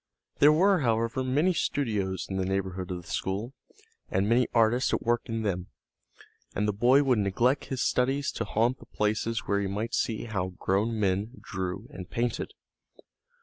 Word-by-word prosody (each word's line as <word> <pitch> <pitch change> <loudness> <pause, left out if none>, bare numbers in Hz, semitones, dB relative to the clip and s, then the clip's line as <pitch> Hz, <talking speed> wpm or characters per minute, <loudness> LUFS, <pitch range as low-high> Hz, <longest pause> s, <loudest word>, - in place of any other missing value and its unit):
There 145 - +8
were, 185 +4 +4
however, 115 -1 0
many 150 +8 +2
studios 105 - -1
in 95 - -3
the 95 - 0
neighborhood 95 -1 -2
of 90 -1 -4
the - - -17
school, 105 +7 -2 0.6
and 95 +2 +1
many 120 +3 +3
artists 115 +2 +3
at - - -4
work 120 0 +2
in 115 -1 -3
them, 90 -4 -2 0.9
and 105 +1 +1
the 105 - +1
boy 125 +7 +4
would 130 -5 +3
neglect 120 +7 +1
his 130 -2 -2
studies 135 +3 +1
to - - -3
haunt 115 +4 +1
the - - -15
places 110 +2 -1
where 100 - 0
he 100 - -1
might 105 +4 -3
see 110 -1 0
how 95 -5 -3
grown 110 +4 0
men 100 +3 0
drew 95 +3 -4
and 95 -10 -8
painted. 120 +1 -2
110 Hz, 175 wpm, -28 LUFS, 95-125 Hz, 0.9 s, There